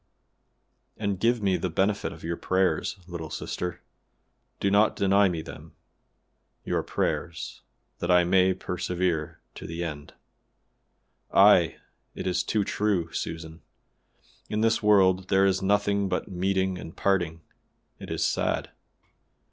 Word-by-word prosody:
"And 100 -3 -2
give 115 0 +2
me 95 -2 +2
the 90 - -2
benefit 100 +5 0
of 80 - -12
your 85 +1 -2
prayers, 95 0 0
little 85 -3 -7
sister, 90 +3 -5 0.8
do 100 - +1
not 105 +2 +4
deny 100 0 +4
me 85 -3 -3
them; 80 +1 -11 0.9
your - - 0
prayers, 85 -1 -3 0.4
that 85 - -3
I 90 0 +6
may 95 +1 +3
persevere 90 -3 -2
to - - -9
the 85 +1 -4
end. 75 -3 -7 1.2
Ay! - - +6 0.4
it - - -5
is 90 -1 +1
too 105 +2 0
true, 95 -5 -1
Susan; 80 -1 -5 0.9
in 105 0 -1
this 115 0 +2
world 95 -3 +4
there 95 0 +4
is 95 -1 +2
nothing 100 0 +1
but - - -2
meeting 95 0 -1
and 80 - -10
parting; 85 -4 0 0.6
it - - -9
is - - 0
sad. - - -1
95 Hz, 130 wpm, -27 LUFS, 85-100 Hz, 1.2 s, I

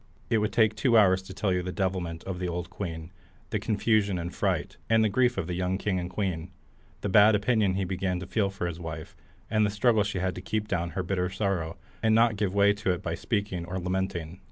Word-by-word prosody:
It 115 - +4
would 105 +1 0
take 110 -2 +4
two 115 +1 +3
hours 95 -3 +5
to 95 - -11
tell 95 0 0
you 90 - +1
the 90 +1 -4
devilment 90 -4 -2
of 95 -2 -5
the 90 - -2
old 90 0 -4
queen, 85 -3 -6 0.4
the - - 0
confusion 105 -3 +1
and 85 +1 -4
fright, - - -1
and 110 -2 +3
grief 125 -1 +3
of 95 - -1
the 90 - -4
young 90 +1 0
king 95 -2 -1
and 90 0 -4
queen, 90 -3 -2 0.5
the - - -2
bad 105 +2 +6
opinion 105 -2 +2
he 95 - 0
began 90 0 -1
to 90 - -6
feel 100 +2 +1
of 95 0 -8
his 85 -2 -3
wife, 80 -2 -7 0.4
and 110 -1 +3
the 105 - +2
struggle 105 +2 +3
she 100 -1 -3
had 95 0 0
to 90 - -7
keep 105 +2 -2
down 85 -4 -1
her 95 - 0
bitter 90 0 -1
sorrow, 95 -5 -2 0.2
and 110 0 +3
not 115 -1 +4
give 100 -2 0
way 100 0 +5
to 105 -1 -3
it 90 +2 -3
by 85 - -2
speaking 100 -2 -2
or 95 +2 -4
lamenting. 90 -2 -3
95 Hz, 235 wpm, -28 LUFS, 90-105 Hz, 0.5 s, bad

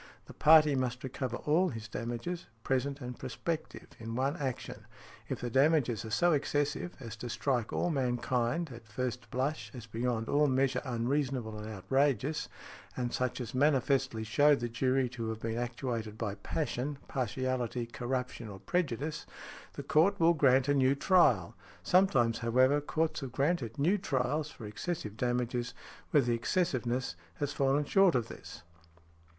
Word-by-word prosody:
The - - -12
party 155 -1 +6
must 125 -1 -1
recover 130 -2 -3
all 170 +5 +2
his 110 -2 -6
damages, 120 +11 -4 0.2
present 135 +2 -1
and 125 0 -6
prospective, 160 +7 -4
in 115 0 -5
one 135 +4 0
action. 130 -5 -5 0.4
If - - -3
the 120 - -3
damages 135 -4 +3
are 110 - -6
so 175 +11 +3
excessive 145 +3 0
as 115 -3 -7
to 120 - -6
strike 120 -2 -1
all 175 - 0
mankind, 125 +3 0
at 115 -1 -12
first 120 +1 -4
blush, 135 +6 -2
as 120 -3 -8
beyond 115 0 -2
all 150 +1 +3
measure 130 -1 +1
unreasonable 125 -2 -1
and 105 +1 -6
outrageous, 135 +6 0 0.5
and 120 -1 -2
such 130 0 -1
as 120 -3 -5
manifestly 135 -3 +2
show 145 +7 +4
the 120 -3 -3
jury 130 +2 +1
to 115 -2 -4
have 110 -1 -4
been 115 +1 -2
actuated 120 -3 -3
by 105 -3 -2
passion, 140 +5 -3
partiality, 130 -1 -2
corruption, 125 0 -4
or 100 - -8
prejudice, 150 - -2 0.5
the - - -6
court 195 +6 +3
will 165 +1 +5
grant 135 -3 +4
a 145 - +3
new 135 -1 +3
trial. 135 - +4 0.3
Sometimes, 175 -12 +3
however, 130 +5 +3
courts 160 +2 -1
have 135 -3 -6
granted 140 -5 0
new 175 +9 +2
trials 145 -2 -1
for 115 - -10
excessive 105 - -4
damages 120 0 -1 0.3
where 145 - +4
the 120 0 +1
excessiveness 125 - 0 0.2
has 145 +8 -2
fallen 140 +2 +2
short 195 0 +4
of 115 -2 0
this. - - -10
130 Hz, 155 wpm, -31 LUFS, 120-145 Hz, 0.5 s, party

